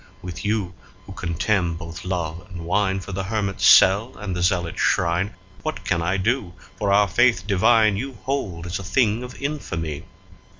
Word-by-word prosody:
With 90 -2 -7
you, 105 -4 -1 0.3
who - - -10
contemn 85 +1 0
both 85 0 -8
love 85 -2 -3
and 90 -3 -8
wine2 95 +2 0
for 100 - -8
the 95 0 -3
hermit's 100 -2 0
cell 105 +7 +6
and 100 -4 -4
the 90 - -2
zealot's 90 -1 0
shrine, 90 +4 +1 0.3
What 155 0 -5
can 85 -2 +1
I 90 +3 0
do, 100 -2 -1 0.2
for 100 -1 +1
our 100 +1 +5
Faith 115 0 +3
divine 105 +1 +4
you 135 +5 -4
hold 100 -12 -3
as 90 +2 -3
a - - -7
thing 110 +2 +1
of 125 0 -9
infamy? 85 - -4
95 Hz, 175 wpm, -23 LUFS, 85-110 Hz, 0.3 s, cell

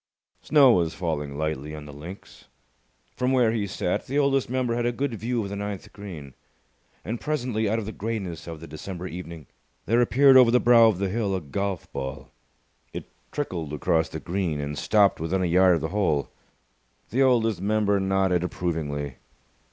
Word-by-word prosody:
Snow 140 -4 +6
was 85 -6 +1
falling 75 -5 -3
lightly 75 -1 -3
on 75 -1 -9
the 75 - -10
links. 85 +7 -11 0.7
From 125 +1 0
where 125 -4 +3
he 110 -3 -1
sat, 90 -2 -2
the 140 - -2
Oldest 140 -3 +2
Member 125 -2 0
had 120 0 0
a - - +1
good 130 +1 -2
view 115 +1 -2
of 100 - -5
the 100 - -5
ninth 100 -1 -6
green; 85 -10 -9 0.7
and 115 +1 -4
presently, 125 -8 -1
out 110 - +1
of 110 - -3
the 110 - -5
greyness 95 -7 -5
of 80 -2 -7
the - - -8
December 90 +4 -7
evening, 85 -3 -8 0.4
there 115 +3 +3
appeared 135 +2 +6
over 125 -2 +7
the 125 +1 +4
brow 120 -2 +6
of 110 -5 +2
the 100 0 -1
hill 100 -1 -1
a - - -1
golf 95 +4 -3
ball. 65 -1 -6 0.6
It - - -8 0.2
trickled 85 - -4
across 80 +2 +1
the 80 - -6
green, 85 -3 -2
and 75 0 -4
stopped 100 +6 +3
within 90 +4 -1
a - - +1
yard 90 +1 +5
of 80 - -2
the 80 - -2
hole. 90 -8 0 0.8
The 130 - +1
Oldest 115 -7 +3
Member 100 0 +1
nodded 95 -2 +1
approvingly. 75 -7 -3
95 Hz, 185 wpm, -25 LUFS, 80-115 Hz, 0.8 s, over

